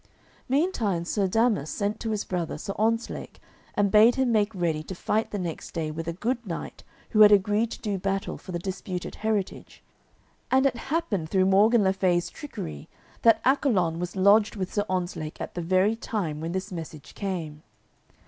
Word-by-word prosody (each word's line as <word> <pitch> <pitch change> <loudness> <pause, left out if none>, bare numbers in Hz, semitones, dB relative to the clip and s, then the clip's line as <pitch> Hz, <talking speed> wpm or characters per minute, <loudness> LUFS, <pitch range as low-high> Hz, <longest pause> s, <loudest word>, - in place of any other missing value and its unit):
Meantime 245 - +1
Sir 195 +2 0
Damas 220 - +1
sent 205 +7 -2
to 225 - -3
his 215 -2 -1
brother, 175 -3 -3
Sir 195 - -5
Ontzlake, 225 +2 -1 0.4
and 200 -1 +2
bade 220 +3 +6
him 265 -2 +1
make 210 -1 +2
ready 165 -4 0
to 185 +4 -7
fight 215 +5 -1
the 205 - -4
next 175 -4 -5
day 160 -2 -2
with 165 +1 -6
a - - 0
good 235 +7 -2
knight 175 -6 -6 0.3
who 215 - +2
had 210 0 +9
agreed 210 +3 +3
to - - -7
do 200 -3 -2
battle 195 +1 -2
for 185 - -10
the 175 - -2
disputed 185 0 -5
heritage; 215 -3 -3 0.7
and 265 +1 +4
it 265 -3 +2
happened 205 - -1
through 185 +1 +3
Morgan 210 +4 +5
le 190 0 +3
Fay's 180 -2 +1
trickery 80 - -7 0.3
that 225 -1 +5
Accolon 205 - +2
was 180 +1 -4
lodged 205 +3 +4
with 190 -3 -4
Sir 205 -1 0
Ontzlake 175 -4 -3
at - - -5
the 175 - -4
very 185 +5 +2
time 180 -10 -3
when 165 +2 -3
this 190 +2 -3
message 160 -4 -8
came. 165 -7 -4
195 Hz, 185 wpm, -26 LUFS, 175-220 Hz, 0.7 s, had